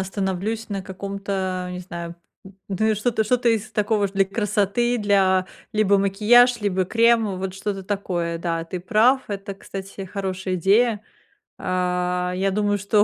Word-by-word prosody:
остановлюсь 195 +3 -3
на 195 -2 -3
каком-то, 190 -1 -4
э, - - -6
не 180 - -5
знаю, 170 -1 -7 0.3
м, 195 0 -13
ну, 210 +3 0
и 220 - +3
что-то 220 +1 0
что-то 245 +2 +2
из 220 -2 0
такого 210 -1 +1
для 195 0 +2
красоты, 210 +3 0
для 190 -3 +3 0.3
либо 210 -2 +3
макияж, 220 +5 +4
либо 190 -2 0
крем, 225 -1 +2
вот 190 0 -4
что-то 195 0 -4
такое. 180 -4 -2
Да, 165 -1 -2
ты 175 +2 -5
прав, 225 +8 +3
это, 200 -1 -5
кстати, 195 0 -8
хорошая 190 -1 -3
идея. 210 +5 +3 0.6
А, 180 0 0
я 195 +1 0
думаю, 205 +1 +1
что 205 +1 +3
195 Hz, 155 wpm, -23 LUFS, 185-215 Hz, 0.6 s, макияж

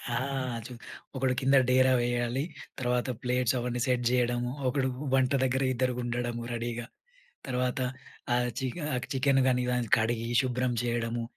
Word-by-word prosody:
ఆ! - - +2 0.5
చు 125 - -8 0.4
ఒకడు 130 -1 +1
కింద 135 +1 +4
డేరా 130 0 +5
వేయాలి. 120 +2 0 0.4
తర్వాత 125 0 0
ప్లేట్స్ 125 0 +1
అవన్నీ 125 0 -2
సెట్ 125 -1 +1
చేయడము. 120 -1 +1 0.2
ఒకడు 130 0 +1 0.2
వంట 130 -1 +3
దగ్గర 130 +1 +1
ఇద్దరుండడము 120 -1 -1
రెడీగా. 120 0 -3 0.6
తర్వాత 125 +1 0 0.6
ఆహ్, 125 0 +1
చికెన్ 150 +4 -3
ఆ - - +1 0.2
చికెన్ 135 0 +3
గాని 125 -1 +2 0.3
కడిగి 115 +1 0
శుభ్రం 125 -1 0
చేయడము. 120 -1 -1
125 Hz, 130 wpm, -29 LUFS, 120-130 Hz, 0.6 s, డేరా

